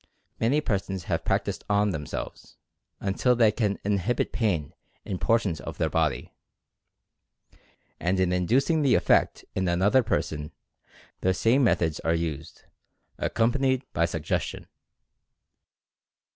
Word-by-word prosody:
Many 135 +7 +2
persons 95 - -2
have - - -2
practiced - - -1
on 105 0 +2
themselves, 75 -4 -6 0.4
until 100 +6 +1
they 115 -3 +5
can 105 -2 -1
inhibit 105 +4 0
pain 90 - -1 0.3
in 95 -3 -4
portions 105 -10 +1
of - - -7
their - - 0
body. 75 -6 -1 1.7
And 90 +2 0
in 90 -1 +2
inducing 130 - +2
the 140 -3 +4
effect - - +2
in 95 -1 -1
another 95 +9 +3
person, 75 -9 -2 0.7
the 95 0 +1
same 120 +8 +3
methods 80 -9 +1
are 80 0 +1
used, 80 -2 -5 0.6
accom 115 +1 +1
panied 130 0 +1
by 85 - +2
suggestion. 85 -2 -3
100 Hz, 120 wpm, -26 LUFS, 85-120 Hz, 1.7 s, they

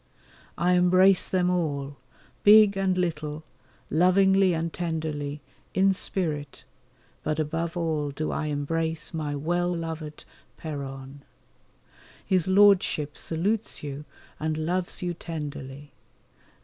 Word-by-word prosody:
I 175 +2 +2
embrace 185 +2 +4
them 180 -1 +1
all, 145 -5 -2 0.5
big 210 -1 +7
and 190 -1 0
little, 155 -3 -2 0.5
lovingly 190 +2 +4
and 165 0 -3
tenderly, 155 -4 -3 0.3
in 195 +1 +4
spirit, 155 -7 -3 0.6
but 155 - -2
above 165 +3 -2
all 155 -3 -1
do 150 +2 -3
I 155 - -2
embrace 160 +3 -2
my 150 -3 -3
well 175 +4 0
loved 160 -3 -5 0.3
Péronne. 135 -2 -7 1.1
His 185 -3 +1
Lordship 190 -6 +4
salutes 195 +6 -2
you 145 0 -6 0.3
and 155 0 -1
loves 175 +4 -2
you 175 -1 -1
tenderly. 145 -4 -7
160 Hz, 110 wpm, -26 LUFS, 150-180 Hz, 1.1 s, big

